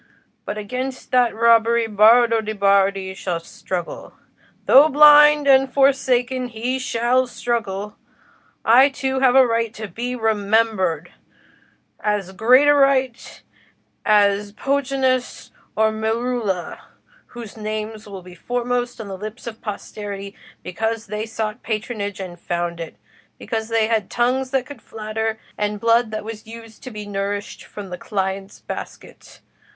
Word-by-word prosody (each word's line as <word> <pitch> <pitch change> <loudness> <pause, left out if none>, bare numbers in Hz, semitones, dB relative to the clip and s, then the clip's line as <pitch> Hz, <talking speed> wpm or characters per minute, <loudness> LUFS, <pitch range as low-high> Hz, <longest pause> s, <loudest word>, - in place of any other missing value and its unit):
But 205 - -4
against 255 +5 -5
that 245 -3 +3
robbery 230 0 +4
Bardo 225 +2 +5
de' 215 0 -5
Bardi 195 -1 +2
shall 180 -3 -3
struggle—though 185 - -1
blind 295 0 +7
and 270 -1 +5
forsaken, 260 -2 +1
he 245 +3 -3
shall 255 +1 +1
struggle. 210 -5 -3 0.7
I 255 +5 +6
too 265 -1 -2
have 260 -1 +3
a 265 -1 +7
right 230 -1 0
to 215 0 -6
be 240 +7 -5
remembered—as 210 -2 -2
great 250 +8 +4
a 290 - +7
right 270 -3 +1 0.6
as 205 -1 +2
Pontanus 265 -1 -1 0.2
or 220 0 +2
Merula, 220 -3 -2 0.6
whose 235 -3 -9
names 215 0 -5
will 195 -2 -9
be 180 0 -13
foremost 245 +5 -3
on 220 - -7
the 195 - -6
lips 215 +3 -8
of 225 -2 -8
posterity, 200 -1 -7 0.3
because 220 +5 -3
they 215 +2 -5
sought 220 -1 -4
patronage 215 -2 -4
and 180 -2 -7
found 170 0 -3
it; 165 -9 -7 0.4
because 220 -1 -4
they 225 -1 +2
had 220 -3 -1
tongues 255 +2 0
that 265 -1 -1
could 285 - -11
flatter, 220 0 -4 0.2
and 210 0 -2
blood 230 +1 +3
that 215 -1 -5
was 220 -1 -8
used 225 -1 -12
to 255 - -8
be 210 -3 -8
nourished 200 0 -4
from 200 -3 -9
the 180 - -6
client's 195 -1 -4
basket. - - -10
220 Hz, 135 wpm, -21 LUFS, 205-245 Hz, 0.7 s, blind